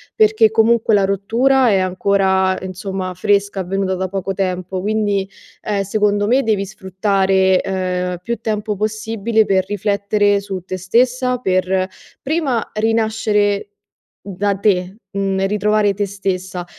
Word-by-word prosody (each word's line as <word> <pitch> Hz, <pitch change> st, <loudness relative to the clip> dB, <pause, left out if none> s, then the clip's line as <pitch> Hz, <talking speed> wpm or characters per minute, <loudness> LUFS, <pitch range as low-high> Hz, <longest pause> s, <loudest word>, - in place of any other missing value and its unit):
perché 220 Hz, +1 st, +4 dB
comunque 225 Hz, 0 st, +3 dB
la 200 Hz, -2 st, +4 dB
rottura 235 Hz, +7 st, +2 dB
è 200 Hz, -, +3 dB
ancora, 190 Hz, 0 st, +1 dB
insomma, 185 Hz, 0 st, -5 dB
fresca, 200 Hz, +1 st, +1 dB
avvenuta 190 Hz, +1 st, -1 dB
da 185 Hz, +1 st, -2 dB
poco 195 Hz, 0 st, -3 dB
tempo, 185 Hz, -1 st, -2 dB
quindi, 205 Hz, -1 st, 0 dB, 0.4 s
ehm, 205 Hz, -2 st, -1 dB
secondo 205 Hz, 0 st, +1 dB
me 260 Hz, +4 st, +3 dB
devi 210 Hz, -3 st, 0 dB
sfruttare, 190 Hz, 0 st, +1 dB
ehm, 180 Hz, -1 st, -2 dB
più 235 Hz, +6 st, -2 dB
tempo 215 Hz, -1 st, -2 dB
possibile 220 Hz, +1 st, 0 dB
per 190 Hz, -2 st, +1 dB
riflettere 205 Hz, 0 st, +1 dB
su 195 Hz, -1 st, -5 dB
te 185 Hz, -, -4 dB
stessa, 250 Hz, +6 st, +1 dB
per 185 Hz, -4 st, 0 dB, 0.3 s
prima 275 Hz, -6 st, -1 dB
rinascere 215 Hz, -2 st, 0 dB, 0.5 s
da 200 Hz, +1 st, -2 dB
te, 190 Hz, -1 st, 0 dB
mhmm, 195 Hz, -1 st, -1 dB
ritrovare 210 Hz, 0 st, +1 dB
te 205 Hz, +1 st, -1 dB
stessa 190 Hz, -2 st, -4 dB
200 Hz, 130 wpm, -18 LUFS, 190-215 Hz, 0.5 s, perché